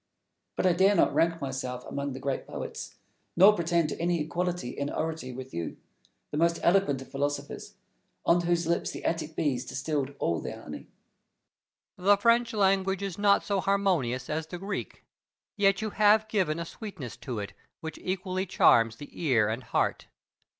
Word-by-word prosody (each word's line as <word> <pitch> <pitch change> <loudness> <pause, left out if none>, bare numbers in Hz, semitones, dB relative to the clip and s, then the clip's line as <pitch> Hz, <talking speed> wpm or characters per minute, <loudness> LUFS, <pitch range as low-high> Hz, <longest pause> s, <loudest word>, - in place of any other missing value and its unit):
But - - -1
I 180 - +5
dare 190 +4 +4
not - - +3
rank 165 0 +2
myself 130 -3 -4
among 140 -1 -4
the 130 - -6
great 135 0 -3
poets, - - -6 0.4
nor 195 +5 +8
pretend 170 -3 +1
to - - -5
any 175 0 +1
equality 175 -1 -2
in 140 +3 -3
oratory 160 -5 -3
with 130 +1 -8
you, 85 -1 -4 0.5
the 150 - -3
most 170 0 +3
eloquent 170 -8 +3
of - - -19
philosophers, 145 +1 -3 0.5
on 175 +1 +4
whose 175 -1 +1
lips 170 +1 0
the - - -7
Attic 160 -1 -2
bees 130 -5 0
distilled 140 0 -3
all 85 - 0
their - - -7
honey. - - -8 1.1
Plato. 185 +2 -1
The 205 - +8
French 230 +2 +3
language 195 -2 +2
is 195 -1 -4
not 200 -1 +4
so 200 -1 0
harmonious 180 -11 +1
as 155 +1 -3
the 180 - -6
Greek, 195 +2 -5 0.5
yet 195 0 +3
you 215 - -2
have 215 +1 +4
given 185 -8 0
a 170 - -3
sweetness 170 - -8
to 125 -4 -5
it 100 -1 -5 0.3
which 160 0 -6
equally 185 0 -2
charms 115 -8 +4
the 145 +5 -11
ear 120 -10 +3
and 115 +3 -2
heart. - - 0
170 Hz, 175 wpm, -28 LUFS, 140-195 Hz, 1.1 s, nor